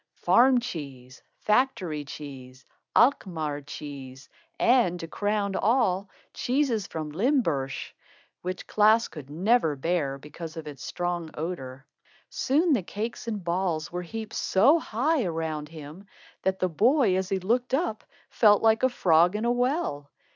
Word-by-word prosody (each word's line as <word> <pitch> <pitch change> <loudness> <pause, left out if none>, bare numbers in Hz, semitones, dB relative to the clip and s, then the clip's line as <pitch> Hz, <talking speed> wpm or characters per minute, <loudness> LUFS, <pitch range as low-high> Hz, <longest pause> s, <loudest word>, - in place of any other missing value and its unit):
Farm 255 +1 +4
cheese, 140 - -8 0.2
factory 210 - +1
cheese, 135 -3 -10 0.3
Alkmaar 160 - +2
cheese, 135 -2 -9 0.3
and, 230 -8 +3
to 165 - -6
crown 205 +2 -1
all, 200 -4 +1 0.2
cheese 250 -5 0
from 155 -2 -5
Limburg 165 - +1 0.7
which 185 +1 -5
Klaas 215 +2 +4 0.2
never 175 0 +2
could 135 - -18
bear, 155 -6 0
because 155 +4 -9
of 160 - -6
its 145 -2 -9
strong 175 -2 -3
odor. 140 -5 -5 0.5
Soon 310 +5 +2
the 240 - +2
cakes 220 +6 -5
and 210 -4 -3
balls 170 -2 -1
were 180 +1 -3
heaped 220 +5 -7
so 270 - +4
high 275 +3 0
around 160 -4 -3
him 160 +5 -11 0.3
that 190 0 0
the 185 - +1
boy, 220 - +3
as 190 0 -1
he 195 - +1
looked 245 +7 0
up, 270 -8 -2 0.3
felt 210 -2 +5
like 225 0 +4
a 260 - +4
frog 175 -5 +3
in 215 +2 -1
a 240 - +2
well. 245 - -1
185 Hz, 140 wpm, -27 LUFS, 155-230 Hz, 0.7 s, felt